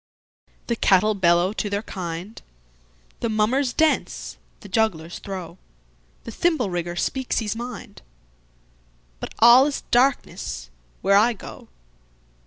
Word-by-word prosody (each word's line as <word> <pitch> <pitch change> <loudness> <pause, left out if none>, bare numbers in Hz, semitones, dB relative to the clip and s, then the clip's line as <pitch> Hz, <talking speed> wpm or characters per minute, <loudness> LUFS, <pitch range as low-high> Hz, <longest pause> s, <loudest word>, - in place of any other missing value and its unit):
The 235 - -1
cattle 215 0 +3
bellow 175 0 +2
to 210 - -3
their 200 +1 -2
kind, 180 +1 -6 0.8
The 230 - -1
mummers 235 +5 +1
dance, 315 +3 0 0.2
the - - -11
jugglers 185 -6 -1
throw, 185 -3 -7 0.6
The - - -7
thimble 310 - 0
rigger 175 0 -3
speaks 260 +8 -2
his 220 -2 -1
mind—But - - -12
all 240 +4 +7
is 290 - -3
darkness 245 - 0 0.3
where 195 +2 +4
I 230 +4 +4
go. 205 - -11
200 Hz, 115 wpm, -23 LUFS, 165-235 Hz, 0.8 s, all